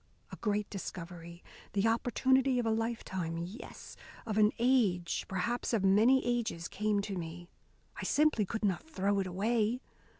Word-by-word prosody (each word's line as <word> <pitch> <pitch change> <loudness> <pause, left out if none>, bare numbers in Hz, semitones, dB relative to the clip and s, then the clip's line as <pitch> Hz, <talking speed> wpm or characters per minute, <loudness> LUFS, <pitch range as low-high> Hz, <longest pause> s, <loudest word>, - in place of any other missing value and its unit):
A - - -6
great 210 -1 -1
discovery, 170 -3 -7 0.3
the 200 +2 +2
opportunity 260 +3 +2
of 245 - 0
a 225 - +2
lifetime, 220 -7 -2
yes, 175 +7 -8 0.3
of 215 -1 -1
an 210 0 +5
age, 225 -9 +2
perhaps 235 +7 -2
of 215 -4 +2
many 220 +7 +5
ages, 230 -8 -1
came 210 -1 0
to 200 -1 -4
me. 175 0 -6 0.5
I - - -5
simply 300 -7 +3
could 220 +1 -2
not 190 -3 +1
throw 200 -5 0
it 190 - -1
away. 215 +5 0
210 Hz, 155 wpm, -32 LUFS, 185-235 Hz, 0.5 s, an